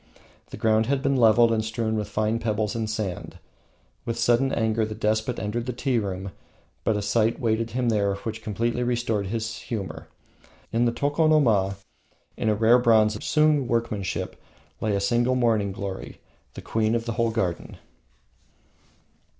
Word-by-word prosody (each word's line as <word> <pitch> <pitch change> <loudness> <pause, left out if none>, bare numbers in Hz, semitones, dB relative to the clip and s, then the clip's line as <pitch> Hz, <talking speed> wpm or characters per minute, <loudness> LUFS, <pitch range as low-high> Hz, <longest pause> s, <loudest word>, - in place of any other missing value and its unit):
The - - -8
ground 110 0 +2
had 135 0 0
been 140 -1 +2
leveled 115 -1 +5
and 110 -1 +1
strewn 110 0 -2
with 105 -2 -3
fine 110 +2 0
pebbles 110 -2 -1
and 110 -2 -2
sand. 105 -5 -4 0.7
With 115 0 -3
sullen 120 +3 +2
anger 110 0 +1
the 110 0 -4
despot 110 +2 0
entered 115 +3 -3
the 125 - -2
tea 125 0 0
room, 95 -2 -4 0.5
but 110 - +1
a 105 - -3
sight 110 +2 +1
waited 115 -1 0
him 120 +1 -1
there 100 -3 +1
which 110 +2 -6
completely 115 +3 -2
restored 120 -4 -1
his 110 +1 -3
humour. 85 -8 -6 0.7
On 120 +1 +2
the 120 - +2
tokonoma, 140 -8 +2 0.6
in 110 - -1
a 105 - +2
rare 115 +3 +5
bronze 110 -3 +4
of 105 - -8
Sung 150 -4 +2
workmanship, 115 -5 -2 0.4
lay 105 -2 0
a - - +1
single 120 +5 +1
morning 110 -5 +1
glory 95 0 -6 0.4
the - - -7
queen 110 0 0
of 115 0 -2
the 120 - -2
whole 115 0 +1
garden! 95 -7 -3
110 Hz, 165 wpm, -25 LUFS, 105-120 Hz, 0.7 s, leveled